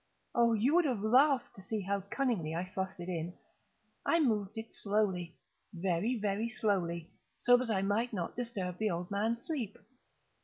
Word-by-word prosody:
Oh, 235 Hz, -1 st, +4 dB
you 230 Hz, +7 st, +3 dB
would 350 Hz, 0 st, +5 dB
have 240 Hz, -8 st, 0 dB
laughed 260 Hz, +4 st, +4 dB
to 195 Hz, -, -11 dB
see 210 Hz, +2 st, -3 dB
how 200 Hz, +1 st, -1 dB
cunningly 200 Hz, -, -1 dB
I 175 Hz, +2 st, -1 dB
thrust 190 Hz, 0 st, -4 dB
it 175 Hz, -, -6 dB
in! 175 Hz, -1 st, -3 dB, 0.7 s
I 335 Hz, -, +3 dB
moved 215 Hz, -8 st, +1 dB
it 225 Hz, 0 st, -6 dB
slowly—very, 190 Hz, 0 st, -1 dB
very 210 Hz, +1 st, -1 dB
slowly, 180 Hz, -7 st, -1 dB, 0.3 s
so 245 Hz, -, +6 dB
that 250 Hz, -1 st, -2 dB
I 195 Hz, -3 st, +1 dB
might 215 Hz, +5 st, +1 dB
not 180 Hz, -6 st, -3 dB
disturb 200 Hz, -7 st, -3 dB
the 215 Hz, -1 st, +2 dB
old 175 Hz, 0 st, -3 dB
man's 225 Hz, +4 st, 0 dB
sleep. 250 Hz, -, -3 dB
205 Hz, 165 wpm, -33 LUFS, 185-235 Hz, 0.7 s, so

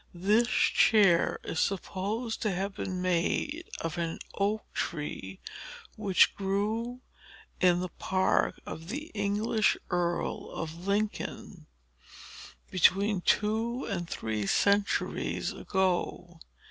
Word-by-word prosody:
"This 210 Hz, +7 st, +3 dB
chair 200 Hz, -8 st, +4 dB
is 160 Hz, -, -3 dB
supposed 205 Hz, +4 st, -2 dB
to 215 Hz, -, +1 dB
have 195 Hz, +2 st, -2 dB
been 185 Hz, -1 st, -4 dB
made 185 Hz, -, 0 dB
of 165 Hz, +1 st, -3 dB
an 165 Hz, -1 st, -2 dB, 0.2 s
oak 205 Hz, +2 st, 0 dB
tree 145 Hz, -, -4 dB, 0.6 s
which 200 Hz, -4 st, +4 dB
grew 215 Hz, +5 st, -2 dB, 0.6 s
in 180 Hz, -1 st, +4 dB
the 185 Hz, -, -2 dB
park 190 Hz, +2 st, +1 dB
of 165 Hz, +1 st, -7 dB
the 295 Hz, -, -5 dB
English 210 Hz, +1 st, +1 dB
earl 175 Hz, -1 st, -1 dB
of 165 Hz, +3 st, -6 dB
Lincoln, 205 Hz, +1 st, -2 dB, 1.0 s
between 190 Hz, +2 st, +3 dB
two 225 Hz, +6 st, +1 dB
and 175 Hz, -3 st, -3 dB
three 110 Hz, -2 st, -2 dB
centuries 200 Hz, -, +1 dB
ago. 180 Hz, -2 st, -1 dB
195 Hz, 105 wpm, -29 LUFS, 175-215 Hz, 1.0 s, chair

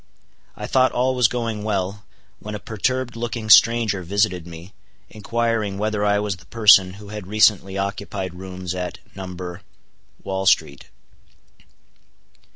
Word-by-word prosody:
I -, -, -5 dB
thought 130 Hz, -1 st, +3 dB
all 130 Hz, +1 st, +1 dB
was 125 Hz, -3 st, +4 dB
going 115 Hz, -3 st, -3 dB
well, 100 Hz, -1 st, -3 dB, 0.3 s
when 105 Hz, 0 st, -7 dB
a -, -, -5 dB
perturbed 125 Hz, +4 st, -2 dB
looking 115 Hz, -2 st, -3 dB
stranger 115 Hz, -4 st, +5 dB
visited 90 Hz, -1 st, -1 dB
me, 85 Hz, +3 st, -11 dB, 0.4 s
inquiring 110 Hz, -2 st, -2 dB
whether 105 Hz, 0 st, -1 dB
I 105 Hz, 0 st, +3 dB
was 105 Hz, -2 st, -2 dB
the 85 Hz, -, -19 dB
person 100 Hz, -5 st, +5 dB
who 100 Hz, +1 st, -12 dB
had 105 Hz, -3 st, -7 dB
recently 100 Hz, -2 st, +3 dB
occupied 100 Hz, -1 st, -4 dB
rooms 90 Hz, 0 st, -6 dB
at 90 Hz, -1 st, -5 dB, 0.2 s
No.—Wall 95 Hz, +1 st, -8 dB
street. 70 Hz, -7 st, +1 dB
100 Hz, 130 wpm, -22 LUFS, 95-110 Hz, 0.4 s, stranger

